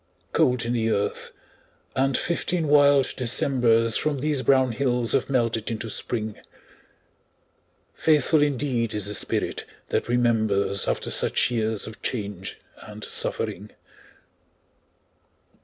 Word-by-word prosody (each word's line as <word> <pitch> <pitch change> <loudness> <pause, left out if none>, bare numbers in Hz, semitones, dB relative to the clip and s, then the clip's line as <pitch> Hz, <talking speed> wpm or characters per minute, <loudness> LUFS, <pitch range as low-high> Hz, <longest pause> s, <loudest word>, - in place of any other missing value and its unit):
Cold 125 -2 +2
in 120 - -1
the 115 -2 0
earth, 100 -2 -2 0.7
and 135 0 +1
fifteen 170 -1 -1
wild 145 -2 +4
Decembers 115 -2 +2
From 150 -2 0
these 145 0 -1
brown 130 -2 +3
hills 120 -1 0
have 135 - 0
melted 115 -4 0
into 115 -1 -4
Spring. 110 -2 -3 1.6
Faithful 155 0 +2
indeed 130 -6 0
is 105 -2 0
the 105 - -2
spirit - - 0 0.3
that - - -1
remembers 110 -5 +1
After - - -2
such - - +1
years 110 -2 0
of 110 0 -10
change 100 -6 -4 0.2
and 105 0 -11
suffering! 105 +3 -1
120 Hz, 115 wpm, -24 LUFS, 110-135 Hz, 1.6 s, wild